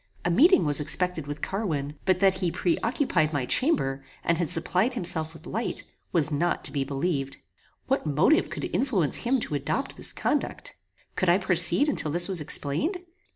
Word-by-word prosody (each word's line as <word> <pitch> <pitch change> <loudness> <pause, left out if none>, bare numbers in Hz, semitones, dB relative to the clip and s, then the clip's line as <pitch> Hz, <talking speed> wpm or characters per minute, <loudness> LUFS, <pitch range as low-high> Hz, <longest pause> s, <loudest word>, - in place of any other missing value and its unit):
A 175 - +2
meeting 335 - +5
was 145 0 +3
expected 160 +1 0
with 145 +1 -7
Carwin, 155 -9 -2
but 185 -1 +2
that 190 -1 +3
he 180 -3 0
pre 175 0 0
occupied 205 - 0
my 140 -4 -1
chamber, 135 - 0 0.2
and 170 0 +1
had 170 -4 -1
supplied 185 +9 +1
himself 165 -6 -1
with 165 - -14
light, 225 +4 -4 0.3
was 160 -3 +3
not 170 +4 0
to - - -5
be 140 -2 -1
believed. 140 0 -2 0.5
What - - -1
motive 160 - +3
could - - -4
influence 195 - +1
him 260 +2 0
to - - -5
adopt 145 - -2
this - - -3
conduct? - - -3 0.4
Could 185 - +1
I 175 - +5
proceed 180 - +4
until 275 - 0
this 175 +3 +1
was 185 -5 +1
explained? 150 - -1
175 Hz, 180 wpm, -26 LUFS, 150-200 Hz, 0.5 s, meeting